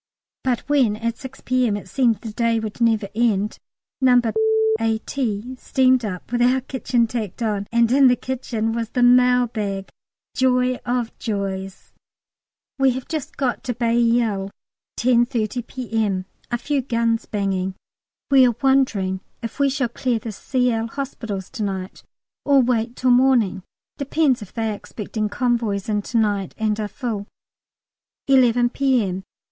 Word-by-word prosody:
But 250 -3 0
when 265 -8 +3
at 230 +1 -3
6 265 -1 -10
P.M. 250 -5 +1
it 205 - -9
seemed 240 -5 +1
the 220 -3 -7
day 230 0 +1
would 220 +1 -6
never 225 -3 +2
end, 215 -2 0 0.4
No. 250 -1 +6 0.6
A.T. 225 +1 -2
steamed 255 -1 +2
up 190 0 -6
with 240 0 0
our 255 +2 +3
kitchen 250 -2 0
tacked 225 -2 -4
on, 205 -2 -1
and 235 0 +3
in 270 +1 +6
the 250 - +5
kitchen 240 -4 -3
was 230 -1 -3
the 245 - 0
mail 250 0 +5
bag 200 -4 -4 0.5
joy 255 -1 +2
of 240 -1 -1
joys! 195 -3 -4 0.9
We 265 -1 +4
have 260 0 -6
just 310 -2 -5
got 255 -4 -1
to 245 -3 -2
Bailleul, 230 -4 +1 0.5
10.30 240 -1 +1
P.M.: 220 -7 -2 0.2
a 240 - 0
few 280 +3 -1
guns 230 -2 0
banging. 190 -2 -2 0.6
We 265 -2 +7
are 240 - 0
wondering 215 -9 +2 0.2
if 230 - -6
we 280 -1 +4
shall 265 -2 0
clear 240 0 -1
the 225 0 -6
Cl. 235 +1 0
hospitals 225 -7 -5
to 220 - -4
night 190 -1 -4 0.4
or 280 -1 +4
wait 240 -1 +1
till 255 -1 +2
morning: 245 -7 +3 0.4
depends 280 -3 +1
if 205 - -10
they 225 -2 -2
are - - -3
expecting 215 +1 -4
convoys 230 -5 -1
in 210 -1 0
to 230 +3 -3
night 205 -4 0
and 215 -1 0
are 210 - -1
full. 215 -3 -4 1.0
11 245 -3 +4
P.M. 230 -10 0
235 Hz, 150 wpm, -22 LUFS, 210-255 Hz, 1.0 s, We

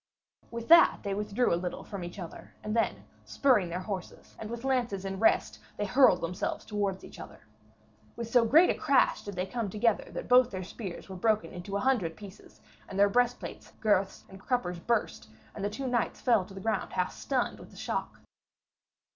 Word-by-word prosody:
With 235 0 -6
that 335 0 +7
they 200 -2 -2
withdrew 210 +3 0
a 170 - 0
little 180 -1 -4
from 200 -3 -7
each 175 +2 -8
other, 175 -4 -9
and 215 +1 -3
then, 230 - 0 0.2
spurring 235 -11 +2
their 175 +2 -3
horses, 185 -1 -7
and 215 - -6
with 235 +1 -6
lances 245 -7 0
in 195 0 -4
rest, 220 - +2 0.2
they 205 - -1
hurled 205 -4 +5
themselves 170 +2 -3
towards 200 -3 -2
each - - -12
other. - - -11 0.7
With 235 - -5
so 240 +1 +4
great 310 +10 +6
a - - +1
crash 280 -3 +2
did 205 -2 -7
they 180 +1 -1
come 225 +1 -3
together 215 +2 +1
that - - -5
both 250 0 +6
their 185 -4 -5
spears 190 -1 -7
were 190 - -8
broken 215 +3 +1
into 190 +3 -4
a - - -2
hundred 215 -12 +1
pieces, 205 -1 -13 0.3
and 195 - -6
their 200 0 +5
breastplates, 245 +3 -1
girths 200 -3 +1
and 190 - -13
cruppers 200 -8 -1
burst, 230 - -1 0.2
and 200 - -6
the 205 - 0
two 230 +6 -5
knights 245 -3 -1
fell 230 -7 +3
to 195 - -13
the 195 - -7
ground 220 -1 -2
half 180 0 -1
stunned 260 -3 -2
with - - -12
the - - -16
shock. - - -4
210 Hz, 200 wpm, -29 LUFS, 190-240 Hz, 0.7 s, that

